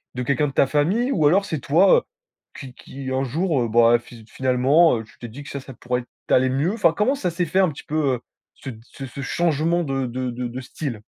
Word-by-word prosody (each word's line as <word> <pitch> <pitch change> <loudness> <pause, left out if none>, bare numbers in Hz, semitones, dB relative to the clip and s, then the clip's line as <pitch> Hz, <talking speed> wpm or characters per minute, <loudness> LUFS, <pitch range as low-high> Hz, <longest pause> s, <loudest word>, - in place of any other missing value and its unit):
de 125 - -2
quelqu'un 145 +3 +1
de 135 - -6
ta 140 - +4
famille 190 - +1
ou 155 - +3
alors 195 +6 +4
c'est 160 -7 -3
toi, 170 +9 +4
heu, - - +1 0.6
qui 130 -3 -9
qui 130 0 -8
un 130 +1 0
jour, 155 +1 0
heu, - - -1
ben 115 +1 +5
fi 120 -2 -15
finalement, 130 +4 +3
heu, 110 - -5
tu - - -20
t'es 120 - -7
dit 135 +6 -10
que - - -11
ça, 140 - -5
ça 135 0 -11
pourrait 125 +1 -3
être 120 - -18 0.2
t'aller 130 0 +3
mieux, 140 +8 0
enfin 200 -8 +2
comment 255 +7 +1
ça 185 -10 -2
s'est 175 +1 -1
fait 185 +5 0
un 185 - +4
petit 145 - -9
peu, 150 -3 0
heu, - - -7 0.3
ce 135 - -9
de 110 -4 -9
ce 135 +2 -10
ce 135 +2 -8
changement 170 +4 0
de 135 -2 -2
de 125 +1 -3
de 125 +1 -4
de 125 +2 -7
style? 130 -4 -6
140 Hz, 260 wpm, -22 LUFS, 125-165 Hz, 0.6 s, ben